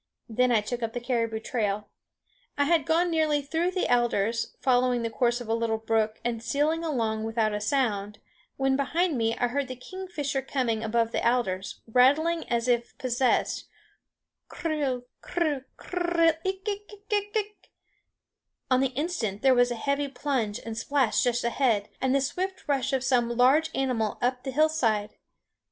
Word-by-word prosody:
Then 250 +2 +2
I 225 -3 +4
took 240 +3 -4
up 225 -1 -2
the 245 - -2
caribou 230 -3 -1
trail. 210 -3 -2 0.7
I 285 - +3
had 310 -1 +2
gone 340 +2 +2
nearly 310 -3 +2
through 325 +5 0
the 370 0 -1
alders, 230 -2 +1
following 250 -2 +2
the 230 - -2
course 240 0 +1
of 245 - -8
a 225 - 0
little 230 -1 0
brook 220 -1 0
and 235 -2 -1
stealing 300 +7 0
along 225 -8 -1
without 225 -1 0
a 210 - -2
sound, 210 -4 0 0.4
when 270 0 +2
behind 315 +4 +1
me 230 -1 0
I 245 - +1
heard 280 +2 -1
the 255 - -6
kingfisher 290 -1 -4
coming 245 -5 -1
above 230 +1 +1
the - - -1
alders, 195 -6 0
rattling 290 +8 +3
as 235 0 0
if 240 -1 0
possessed, 255 -1 0 0.8
klrrr, 290 -7 -2 0.2
klrrr, 305 -6 -1
klrrr 345 -2 +1
ik 385 +2 -3
ik 410 0 -5 0.3
ik! 415 -3 -3 1.0
On 255 - +5
the 265 -1 0
instant 275 - -2
there 265 -1 +6
was 245 0 +4
a 240 - -2
heavy 280 +4 -1
plunge 255 -6 -2
and 225 -1 -5
splash 270 -2 +1
just 245 0 +1
ahead, 235 -4 +1
and 265 0 +2
the 275 - +3
swift 375 +8 -3
rush 275 -1 +1
of 265 -1 0
some 240 -3 +1
large 280 +6 +4
animal 245 -6 0
up 250 +1 0
the 270 - -5
hillside. 255 -8 +1
255 Hz, 165 wpm, -27 LUFS, 230-295 Hz, 1.0 s, there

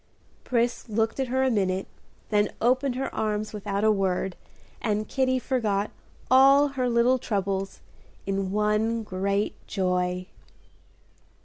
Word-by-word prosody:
Pris 240 -1 -1
looked 225 +3 0
at 265 - 0
her 260 +2 +1
a 260 - +2
minute, 190 -3 0 0.4
then 210 -1 +2
opened 255 +2 +2
her 265 +1 -3
arms 215 0 -2
without 200 -1 -3
a 220 - +5
word, 190 -2 0 0.5
and 215 -1 -1
Kitty 260 -1 +1
forgot 215 -5 -1 0.4
all 275 +2 +6
her 255 -2 -1
little 240 +2 +3
troubles 195 -3 -2 0.4
in 195 -1 -1
one 210 +2 +1
great 200 +1 -1
joy. 180 -1 -1
215 Hz, 125 wpm, -26 LUFS, 195-250 Hz, 0.5 s, all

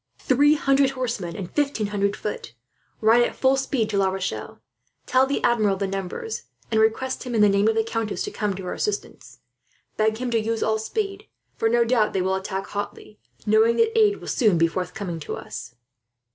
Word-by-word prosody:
"Three 290 +3 +4
hundred 275 -2 +3
horsemen 225 -9 -3
and 180 -3 -6
fifteen 280 -7 0
hundred 200 0 +1
foot! 165 - -6 0.5
Ride 225 +2 +5
at 240 - 0
full 265 0 +3
speed 265 -4 0
to 200 - +1
La 190 -1 +3
Rochelle. 190 0 -4 0.5
Tell 260 +1 +3
the 280 - -2
Admiral 215 -4 +3
the 200 - -1
numbers, 195 - -4 0.3
and 220 -1 +3
request 240 +4 0
him, 250 -2 -4
in 215 - +3
the 210 - +7
name 200 +1 +3
of 220 - +2
the 225 - +2
countess, 225 -1 -2
to 410 - -4
come 210 - -2
to 190 - -7
her 180 - -4
assistance. 420 -1 -4 0.6
Beg 220 0 +2
him 250 0 -3
to 230 - +2
use 225 +1 -1
all 220 0 +1
speed, 395 - -3 0.3
for 225 - +1
no 235 0 +3
doubt 230 -3 +2
they 190 - +1
will 190 +1 0
attack 190 0 -3
hotly, 110 - -6 0.3
knowing 220 +2 +4
that 455 0 +2
aid 420 -2 +4
will - - -10
soon 215 -9 +3
be 165 - +4
forthcoming 180 0 -4
to 150 - -5
us." 120 - -8
220 Hz, 200 wpm, -24 LUFS, 195-260 Hz, 0.6 s, the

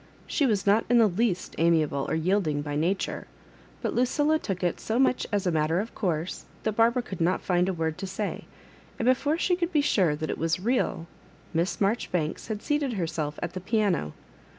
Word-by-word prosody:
She 285 - +1
was 210 -5 +1
not 205 +3 +4
in 245 - +5
the 230 - +7
least 195 -1 0
amiable 155 -4 +2
or - - 0
yielding 160 -3 +1
by 145 -1 -4
nature; 175 +6 -1 0.6
but - - -1
Lu 245 - +2
cilla 295 +5 +2
took 190 -3 -3
it 175 - 0
so 220 - -2
much 255 -1 +2
as 205 -2 0
a 180 - +2
matter 160 +2 +1
of 220 +3 -4
course 175 -4 -2 0.2
that 220 - +1
Barbara 235 +2 +3
could 190 -7 -7
not 175 +3 +1
find 180 0 +2
a - - 0
word 160 -2 -2
to 195 - -4
say; 195 +2 -4 0.5
and 230 - -2
be 255 - +6
fore 290 +5 -1
she 360 +1 +2
could 350 0 -2
be 305 -4 +3
sure 185 - +2
that 155 +1 -3
it - - -5
was 165 +2 0
real, 225 -5 0 0.5
Miss 170 +3 0
Marjoribanks 190 -6 -1
had 215 -2 -4
seated 295 -4 0
heraelf 160 -5 -2
at 175 - -3
the 185 - -5
piano. 195 - 0
190 Hz, 210 wpm, -27 LUFS, 165-230 Hz, 0.6 s, the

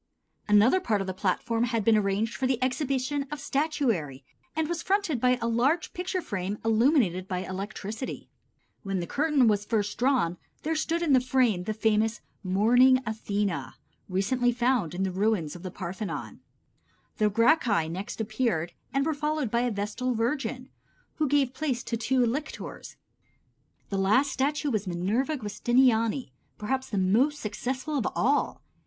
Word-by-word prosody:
Another 210 - +5
part 220 - 0
of 195 - -2
the 190 - -3
platform 215 +5 0
had 230 -3 -1
been 225 - +5
arranged 210 +2 +1
for 260 - -1
the 260 -1 +1
exhibition 275 +1 -1
of 295 0 -5
statuary 235 - -1 0.3
and 320 0 0
was 340 0 -2
fronted 380 - 0
by 250 0 +3
a 230 - -1
large 270 +8 +1
picture 365 0 -3
frame 200 -2 -3
illuminated 225 - +3
by 185 -1 -3
electricity. 200 +5 -5 0.5
When 195 -2 -2
the 175 - -2
curtain 290 - +2
was 205 -2 +2
first 205 -1 -1
drawn 245 -10 +2 0.3
there 320 +2 -1
stood 330 +2 0
in 300 -5 +3
the 260 - +7
frame 245 -8 +1
the 215 - -1
famous 220 +1 +1 0.2
"Mourning 240 +7 +5
Athena," 200 - -2 0.3
recently 245 +7 +1
found 240 - 0
in 190 - -1
the 190 - -1
ruins 190 -5 0
of 175 - -9
the 185 - -5
Parthenon. 185 +2 -6 0.8
The 215 -2 +3
Gracchi 230 - +3
next 185 +7 -6
appeared 215 -6 -1 0.2
and 275 0 +1
were 320 - +1
followed 300 -4 -1
by 235 - +2
a 245 - +1
vestal 225 +4 -2
virgin, 255 +2 -2 0.5
who 310 - +1
gave 275 -3 +2
place 265 -4 -2
to 230 0 -3
two 250 +2 +2
lictors. 270 +6 -5 0.9
The 195 - -1
last 255 +9 +3
statue 290 +2 0
was 210 -4 -1
Minerva 210 - 0
Giustiniani, 235 +2 +1 0.3
perhaps 260 +5 -2
the 205 - -2
most 235 +11 +2
successful 260 +7 -3
of 225 - -1
all. 280 +5 +1
230 Hz, 160 wpm, -27 LUFS, 200-270 Hz, 0.9 s, the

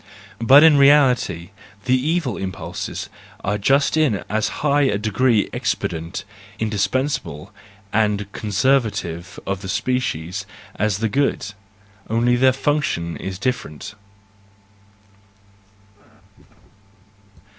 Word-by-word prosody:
But 135 +6 +7
in 160 -3 +7
reality 130 - +4 0.3
the 130 - +2
evil 145 -1 0
impulses 95 0 -5 0.4
are 105 +2 -1
just 140 +9 +2
in 150 -11 +1
as 110 0 0 0.2
high 145 0 +3
a 135 -7 +2
degree 110 +2 +1
expedient, 85 +2 -3 0.3
indispensable, 110 +6 -2 0.4
and 105 -1 +1
conservative 100 -6 -1
of 95 -1 -3
the 95 - -7
species 100 -5 -2 0.3
as 105 -1 0
the - - +1
good 135 -5 -1 0.6
:—only, 120 +2 +2
their 130 +1 +4
function 135 - -1
is 95 -1 -6
different. 105 - -4
110 Hz, 95 wpm, -21 LUFS, 95-130 Hz, 0.6 s, But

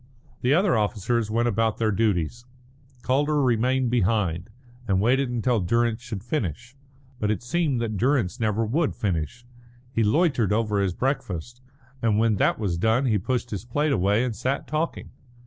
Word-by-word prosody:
The 130 +4 +3
other 185 -2 +3
officers 110 +1 0
went 115 +2 +1
about 115 -1 +1
their 110 -1 +1
duties; 105 +1 0 0.6
Calder 145 +3 +1
remained 125 0 +2
behind, 95 -6 0 0.4
and 95 -2 +2
waited 130 +5 +2
until 120 -1 +1
Durrance 115 +4 +1
should 115 -5 -6
finish. 120 - -3 0.4
But 105 - 0
it 110 +2 -1
seemed 140 0 0
that 110 -3 -2
Durrance 125 -2 +1
never 110 0 0
would 145 +8 0
finish. 90 - -3 0.5
He 115 -3 +1
loitered 120 - +2
over 105 -1 +1
his 95 -3 -1
breakfast, 125 - -3 0.4
and 110 -3 +2
when 110 -1 +2
that - - +2
was 95 -6 -2
done 115 +7 +2
he 110 -5 +2
pushed 125 +4 -2
his 105 -2 -4
plate 145 +5 0
away 105 0 +2
and 125 -3 -2
sat 130 +7 -2
talking. 155 +2 -3
115 Hz, 165 wpm, -25 LUFS, 105-130 Hz, 0.6 s, The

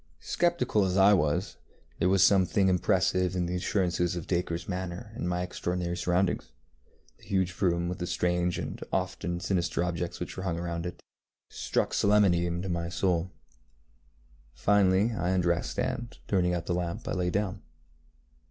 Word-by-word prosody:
Sceptical 170 - +1
as 95 0 0
I 100 +2 +7
was, 85 +2 0 0.4
there 90 - +3
was 95 -1 +4
something 95 0 +4
impressive 90 0 +2
in 90 -1 0
the 85 - -3
assurance 90 -1 0
of 85 -1 0
DacreŌĆÖs 85 -2 -2
manner, 95 +3 -5
and 100 -7 -3
my 90 0 -1
extraordinary 90 -1 -3
surroundings, 90 -8 0 0.7
the - - -18
huge 95 -3 -1
room 85 -2 +2
with 90 +1 -4
the 90 - -3
strange 90 0 0
and - - -5
often 85 0 -2
sinister 85 -2 0
objects 85 0 -3
which - - -5
were - - -5
hung 90 -3 -2
round 85 0 -3
it, 90 - -9 0.5
struck - - -1
solemnity 100 -4 +3
into 85 +2 -3
my 85 -1 -2
soul. 90 0 0 1.3
Finally 100 +1 +3
I 95 -5 -1
undressed, 85 -2 0
and, 120 0 -3
turning 90 -3 +2
out 85 - -4
the 90 - -1
lamp, 90 +5 -3
I - - -2
lay 90 -2 0
down. 95 +1 -2
90 Hz, 160 wpm, -29 LUFS, 85-95 Hz, 1.3 s, I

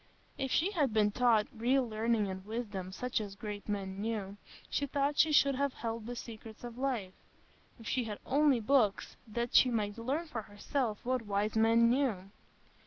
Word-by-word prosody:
If 270 -2 -2
she 345 +9 +2
had 295 - +1
been 210 -1 +4
taught 230 -2 +3
"real 250 +3 +2
learning 220 -1 0
and 190 0 -5
wisdom, 205 -4 -5
such 250 +4 -2
as 200 -2 -7
great 210 0 -7
men 195 -1 -3
knew," 205 -3 -3 0.3
she 285 - -1
thought 285 +2 0
she 310 +1 +5
should 280 -2 +5
have 280 0 0
held 225 -1 -4
the 245 - -4
secrets 225 -1 -9
of 240 0 -7
life; 240 -9 -1 0.7
if 225 - -10
she 250 -2 0
had 210 -2 -5
only 280 -1 +3
books, 220 -3 +2
that 235 +2 -3
she 255 - +7
might 215 -2 -1
learn 275 +9 -1
for 245 -8 -5
herself 215 +2 -3
what 255 0 +1
wise 205 +2 0
men 225 +1 +5
knew! 230 -7 0
230 Hz, 180 wpm, -32 LUFS, 210-255 Hz, 0.7 s, she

